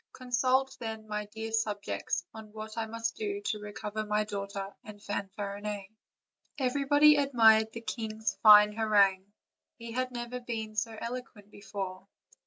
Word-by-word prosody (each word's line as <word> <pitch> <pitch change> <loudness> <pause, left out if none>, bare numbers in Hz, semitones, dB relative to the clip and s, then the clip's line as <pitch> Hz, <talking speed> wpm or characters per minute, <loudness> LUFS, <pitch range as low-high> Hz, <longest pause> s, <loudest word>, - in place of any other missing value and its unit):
Consult, 255 +1 +1
then, 220 -2 -6
my 210 0 -3
dear 220 +1 -6
subjects, 215 -2 -2
on 220 -1 -10
what 215 0 -7
I 225 -1 -2
must 230 +1 -3
do 405 -2 -2
to 220 - -2
recover 210 +1 -5
my 210 0 +1
daughter 200 -1 -5
and 210 -1 -11
Fanfarinet." 200 0 -5 0.7
Everybody 290 +3 +4
admired 225 -6 +5
the 230 - -7
king's 220 -2 -3
fine 210 -1 +9
harangue; 205 -3 +2 0.5
he 230 0 -8
had 255 +2 -1
never 240 0 -5
been 225 -3 -5
so 220 +1 -2
eloquent 235 -4 -7
before. 195 -2 -6
220 Hz, 140 wpm, -30 LUFS, 210-240 Hz, 0.7 s, fine